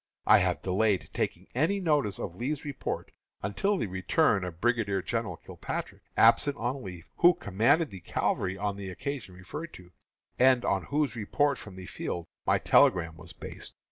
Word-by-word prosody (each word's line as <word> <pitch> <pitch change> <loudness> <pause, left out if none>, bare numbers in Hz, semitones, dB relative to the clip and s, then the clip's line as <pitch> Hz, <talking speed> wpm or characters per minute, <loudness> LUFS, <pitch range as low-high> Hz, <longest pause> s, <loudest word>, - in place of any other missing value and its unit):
I - - +7
have - - 0
delayed 95 +1 +1
taking - - -2
any 160 +10 +1
notice 150 - +1
of 85 - -5
Lee's 140 +9 -3
report 140 -3 -4 0.3
until 195 - 0
the - - -1
return 95 - +2
of 85 -2 -6
Brigadier 110 -5 +1
General 115 +1 -2
Kilpatrick, - - -6 0.2
absent 145 -1 +5
on 125 +3 -2
leave, 90 -4 -8
who 175 +1 +6
commanded 115 - +2
the 95 - -8
cavalry 95 +2 -1
on 100 0 -2
the 100 -1 -6
occasion 115 -1 -5
referred 150 - -7
to, 90 -1 -14 0.5
and 130 -1 +5
on 95 -2 +1
whose 145 -4 0
report 140 +6 +1
from 100 -3 -10
the 95 -1 -8
field 85 -1 -4 0.2
my - - +4
telegram 80 -3 +4
was 85 0 -9
based. - - -7
105 Hz, 170 wpm, -29 LUFS, 95-140 Hz, 0.5 s, I